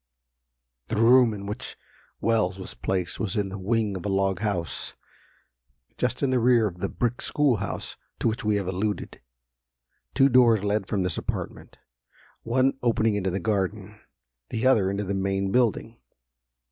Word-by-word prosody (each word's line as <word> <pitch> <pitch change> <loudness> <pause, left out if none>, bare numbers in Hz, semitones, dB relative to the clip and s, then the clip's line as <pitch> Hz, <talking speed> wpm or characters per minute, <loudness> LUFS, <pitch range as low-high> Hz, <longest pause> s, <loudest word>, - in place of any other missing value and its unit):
The 115 - -2
room 120 +2 +6
in 100 -2 -6
which 105 +1 -6 0.4
Wells 110 -5 +1
was 95 - -7
placed 90 -2 -3
was 100 -4 -2
in 100 -2 0
the 95 +1 -6
wing 105 +1 0
of 90 - -6
a - - -2
log 95 -1 +1
house, 100 -6 -2 1.0
just - - -2
in 135 - +2
the 130 - +3
rear 120 -1 +4
of 90 -4 -4
the 100 - -2
brick 120 0 -2
school 145 -6 +2
house 100 0 -5 0.2
to - - 0
which 110 +1 -1
we 105 -1 +2
have 100 -2 -1
alluded. 95 +3 -3 0.9
Two 135 - +6
doors 120 -5 +5
led 105 -1 0
from 100 -4 0
this 90 -3 -1
apartment, - - -5 0.6
one 130 +3 +1
opening 115 -2 +2
into 100 -2 -1
the 95 +2 -2
garden, 105 0 -2 0.5
the 115 +2 -2
other 110 -8 +4
into 100 +1 -2
the 100 0 -3
main 95 0 -1
building. 115 -1 0
105 Hz, 165 wpm, -26 LUFS, 95-115 Hz, 1.0 s, room